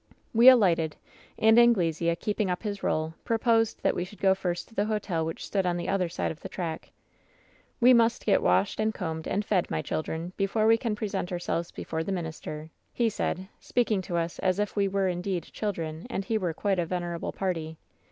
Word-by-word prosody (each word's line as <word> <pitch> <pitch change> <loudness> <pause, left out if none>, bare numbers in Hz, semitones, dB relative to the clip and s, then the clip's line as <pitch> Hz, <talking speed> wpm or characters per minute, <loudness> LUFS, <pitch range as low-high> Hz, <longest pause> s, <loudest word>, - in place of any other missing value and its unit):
"We 235 +3 +9
alighted, 170 -11 +4 0.4
and 220 +1 +6
Anglesea, 170 -8 +3
keeping 205 +2 -1
up 180 +3 -2
his 205 -2 -4
role, 155 +1 -1
pro* 230 - 0
posed 225 -1 +2
that - - +3
we 175 - -1
should 185 +2 -11
go 190 -1 +4
first 175 -2 -3
to - - -19
the 205 -1 +1
hotel 210 -6 -1
which 160 0 -4
stood 195 -2 0
on 175 -1 0
the 175 - -4
other 185 -3 +1
side 170 - -2
of 160 - -9
the - - -8
track. 165 -3 -5 0.5
" - - -34
We 250 +1 +7
must 230 -1 +3
get 200 - +4
washed, 90 - +2
and 220 0 0
combed, 160 -3 -4
and 205 +1 -1
fed, 190 -4 +1
my 80 - -2
children, 160 +3 -3
before 205 +2 +1
we 225 +1 +5
can 225 -3 -1
present 200 -4 -3
ourselves 175 -1 -2
before 160 0 -4
the 195 - -4
mitt* 180 -3 -2
ister,' 155 0 -7 0.2
he 235 -2 +1
said, 190 -2 -3
speaking 225 -5 0
to 175 -1 -3
us 170 0 -2
as 185 -1 +1
if 210 0 -1
we 200 -1 +2
were 195 0 0
indeed 180 -1 -2
chil 210 -1 -1
dren 160 0 -6
and 195 -5 -3
he 225 - -1
were 180 -4 -1
quite 195 0 0
a 175 - +1
venerable 175 -1 -3
party. 165 -4 -3
185 Hz, 220 wpm, -28 LUFS, 170-210 Hz, 0.5 s, We